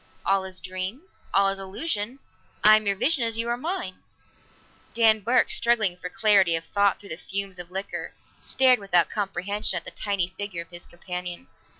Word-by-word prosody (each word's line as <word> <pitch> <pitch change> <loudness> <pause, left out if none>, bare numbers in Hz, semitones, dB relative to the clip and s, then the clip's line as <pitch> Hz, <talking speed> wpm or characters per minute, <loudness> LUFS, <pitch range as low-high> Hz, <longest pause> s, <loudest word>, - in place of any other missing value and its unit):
"All 195 0 +2
is 185 -1 -5
dream, 185 - -5 0.3
all 195 0 +4
is 195 0 -1
illusion; 205 - -3 0.5
I 215 +1 +9
am 215 -1 0
your 200 - +2
vision 275 +5 +1
as 230 -1 +1
you 230 +1 -1
are 240 - +1
mine." 260 - -5 0.9
Dan 220 -2 +4
Burke, 235 +5 +2
struggling 225 -6 +3
for 180 0 -7
clarity 195 -4 +4
of 165 - -3
thought 200 +1 +1
through 200 - -13
the 160 - -5
fumes 195 0 -2
of 175 -1 -7
liquor, 190 +2 -5 0.2
stared 255 -3 +3
without 180 -5 +2
comprehension 200 -1 -1
at 170 - -4
the - - -6
tiny 200 -3 -1
figure 185 -2 -6
of 170 - -28
his 175 0 -9
companion. 180 +4 -7
200 Hz, 185 wpm, -25 LUFS, 185-220 Hz, 0.9 s, I